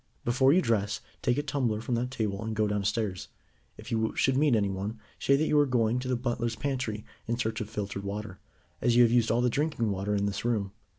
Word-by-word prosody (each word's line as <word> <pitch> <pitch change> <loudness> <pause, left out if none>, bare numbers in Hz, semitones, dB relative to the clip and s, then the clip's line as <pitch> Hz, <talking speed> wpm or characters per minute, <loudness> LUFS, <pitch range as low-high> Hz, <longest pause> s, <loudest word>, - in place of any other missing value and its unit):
"Before 130 +3 +4
you 180 +4 +4
dress, 105 -2 0 0.2
take 125 +1 +1
a 145 - 0
tumbler 130 -7 0
from 120 +2 -3
that 120 +1 0
table, 110 -5 -2
and 110 0 -3
go 110 0 +2
downstairs. 105 -1 -1 0.5
If - - -10
you 110 -1 0
should 135 - +2
meet 140 -2 +4
anyone, 100 +1 -1 0.2
say 140 - +3
that 150 +3 +2
you 150 -1 +3
are 145 - +4
going 120 -1 +2
to 130 - -5
the 130 - +1
butler's 120 -1 -2
pantry 125 -7 -3 0.2
in 115 +1 0
search 110 -2 -2
of 105 - -5
filtered 100 -1 -4
water, 100 -1 -5 0.4
as 120 - +3
you 120 - +8
have 115 - +4
used 120 -2 +3
all 120 +2 +2
the 125 - +3
drinking 145 -7 0
water 100 +2 -1
in 100 0 +1
this 100 -1 -2
room. 110 -5 0
115 Hz, 230 wpm, -29 LUFS, 105-125 Hz, 0.5 s, you